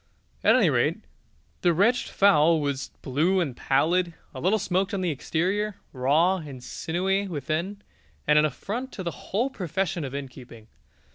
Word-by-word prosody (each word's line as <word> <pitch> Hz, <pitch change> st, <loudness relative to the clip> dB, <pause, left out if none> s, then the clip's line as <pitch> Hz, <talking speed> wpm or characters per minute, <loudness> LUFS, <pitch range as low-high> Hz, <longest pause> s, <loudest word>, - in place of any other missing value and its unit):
At -, -, +6 dB
any -, -, +4 dB
rate, -, -, 0 dB, 0.6 s
the 175 Hz, -2 st, +3 dB
wretched 230 Hz, +8 st, +2 dB
fowl 170 Hz, -5 st, +4 dB
was 140 Hz, -2 st, -2 dB
blue 160 Hz, +8 st, +2 dB
and 145 Hz, -9 st, -1 dB
pallid, 165 Hz, +7 st, +1 dB, 0.2 s
a 130 Hz, -, -7 dB
little 190 Hz, +6 st, +3 dB
smoked 195 Hz, 0 st, 0 dB
on 190 Hz, -, -2 dB
the 180 Hz, -2 st, 0 dB
exterior, 190 Hz, +8 st, -1 dB, 0.2 s
raw 150 Hz, +8 st, +3 dB
and 140 Hz, -7 st, -9 dB
sinewy 190 Hz, +8 st, -1 dB
within, 170 Hz, +6 st, -3 dB, 0.4 s
and 150 Hz, 0 st, +5 dB
an 150 Hz, -, +4 dB
affront 220 Hz, -, -4 dB
to 190 Hz, -, -6 dB
the 170 Hz, -, -2 dB
whole 235 Hz, +11 st, -2 dB
profession 180 Hz, -, -2 dB
of 135 Hz, -1 st, -5 dB
innkeeping. 125 Hz, -5 st, -9 dB
170 Hz, 155 wpm, -26 LUFS, 145-195 Hz, 0.6 s, At